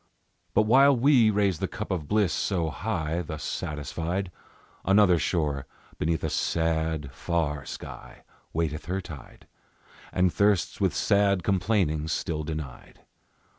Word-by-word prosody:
But 110 - +5
while 135 +5 +5
we 125 -3 +5
raise 100 -4 +1
the - - -1
cup - - -6
of 85 -6 -2
bliss 105 -2 +2
so 85 -5 -1
high, 85 -4 -2
Thus 80 -2 -6
satisfied, 85 +5 -3 0.5
Another 95 -3 +5
shore 75 -7 -1 0.3
beneath 80 0 0
a - - 0
sad, 80 -3 0
far 75 -2 -2
sky - - -9 0.3
Waiteth 80 -2 -2
her 95 +4 -2
tide, 80 -6 -11 0.7
And 90 -1 +2
thirsts 100 -2 +1
with - - +2
sad 100 -2 +2
complainings 90 -6 +1
still 80 -2 -2
denied. 75 -4 -7
85 Hz, 130 wpm, -27 LUFS, 80-100 Hz, 0.7 s, But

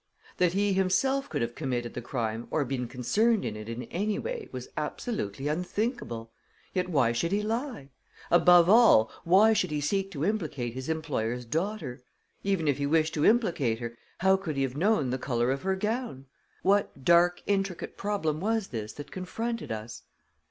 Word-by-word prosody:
That 180 -1 +3
he 200 +1 +2
himself 265 +9 +1
could - - -1
have 115 0 -3
committed 120 -5 -3
the 120 - -5
crime 115 -2 -3
or 150 -3 0
been 125 -1 -3
concerned 205 - +1
in 105 - -3
it 105 +1 -8
in 115 +2 -4
any 205 +3 -2
way 480 -3 -5
was - - -6
absolutely 140 - -3
unthinkable. 160 - -2 0.4
Yet 180 -1 -1
why 140 -8 +3
should 120 +9 -1
he 205 +1 +1
lie? 225 - -3 0.4
Above 175 0 +7
all, 210 - +6
why 200 +6 +6
should 185 -4 +1
he 150 -1 -1
seek 195 +6 0
to 145 0 -2
implicate 150 - -2
his 130 +3 -6
employer's 125 -7 -2
daughter? 160 - -3 0.4
Even 195 -5 0
if 145 -1 +1
he 140 - 0
wished 160 +1 +2
to 150 - +1
implicate 170 - +2
her, 115 0 -6 0.3
how 190 +1 +5
could 170 -6 -4
he 135 - +1
have 130 -1 -2
known 165 - +2
the 130 - -2
color 120 -1 0
of 135 - -2
her 190 0 0
gown? 210 - -3 0.4
What 195 -8 +1
dark, 175 +1 +4
intricate 195 -3 -1
problem 195 -7 -1
was 220 +2 -1
this 110 -3 -5
that 145 0 -9
confronted 225 - -4
us? 110 +1 -6
165 Hz, 180 wpm, -28 LUFS, 125-200 Hz, 0.4 s, Above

